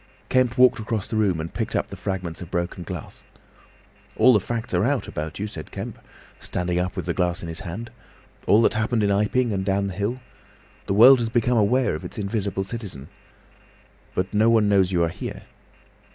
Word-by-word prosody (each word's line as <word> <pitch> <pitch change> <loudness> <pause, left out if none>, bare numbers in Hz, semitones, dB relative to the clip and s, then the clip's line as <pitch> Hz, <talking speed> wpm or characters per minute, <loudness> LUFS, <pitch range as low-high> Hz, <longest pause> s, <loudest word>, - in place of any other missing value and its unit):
Kemp 130 -1 +2
walked 125 -1 +5
across 110 -2 -3
the - - -4
room 100 -6 +2
and 80 +1 -5
picked - - -3
up - - -1
the - - -5
fragments 90 -4 -4
of 90 - -8
broken 90 0 -3
glass. - - -8 0.9
"All 130 - +6
the 105 - +5
facts 115 +3 -4
are 90 +1 +2
out 135 +2 0
about 75 +1 -5
you," 105 - -3
said 95 -7 -8
Kemp, - - -7 0.4
standing 90 0 -2
up 90 0 -2
with - - -4
the 85 - -1
glass 90 -1 -1
in - - -5
his 80 -1 -5
hand; 100 +6 -7 0.6
"all 110 +3 +5
that - - +3
happened 110 +1 0
in 100 - +2
Iping, 105 +4 +1
and 95 -1 -1
down 100 +1 0
the 100 - -3
hill. 105 +6 -2 0.7
The 100 - 0
world 125 +5 +8
has 115 -1 -1
become 120 +1 +2
aware 125 +5 +2
of - - -5
its - - -8
invisible 100 -2 -2
citizen. 95 - -6 1.1
But 95 +3 -2
no 110 +2 +4
one 110 -2 +4
knows 95 -2 +3
you 85 -2 +2
are 85 - +1
here." - - -7
100 Hz, 205 wpm, -24 LUFS, 90-115 Hz, 1.1 s, world